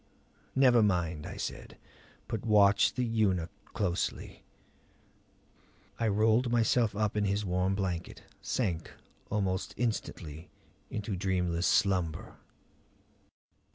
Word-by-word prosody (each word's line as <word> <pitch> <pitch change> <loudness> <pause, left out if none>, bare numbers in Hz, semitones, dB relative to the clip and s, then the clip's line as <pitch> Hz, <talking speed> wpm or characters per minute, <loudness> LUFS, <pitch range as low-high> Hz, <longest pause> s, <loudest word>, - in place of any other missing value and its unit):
"Never 125 -3 +5
mind," 85 -6 0
I - - -7
said. - - -6 0.5
"But 110 -3 -4
watch 105 -3 +4
the 125 - 0
eunuch 100 -7 +1
closely." 90 -5 -3 1.6
I 115 - +1
rolled 110 +4 +3
myself 115 -2 +2
up 105 0 0
in 105 -1 +1
his 100 +1 0
warm 90 +1 0
blanket; 90 -4 -3 0.2
sank 90 -10 -2 0.4
almost 95 -2 -1
instantly 85 -9 -3 0.4
into 105 -1 -3
dreamless 90 -2 0
slumber. 90 -7 +1
100 Hz, 100 wpm, -30 LUFS, 90-110 Hz, 1.6 s, Never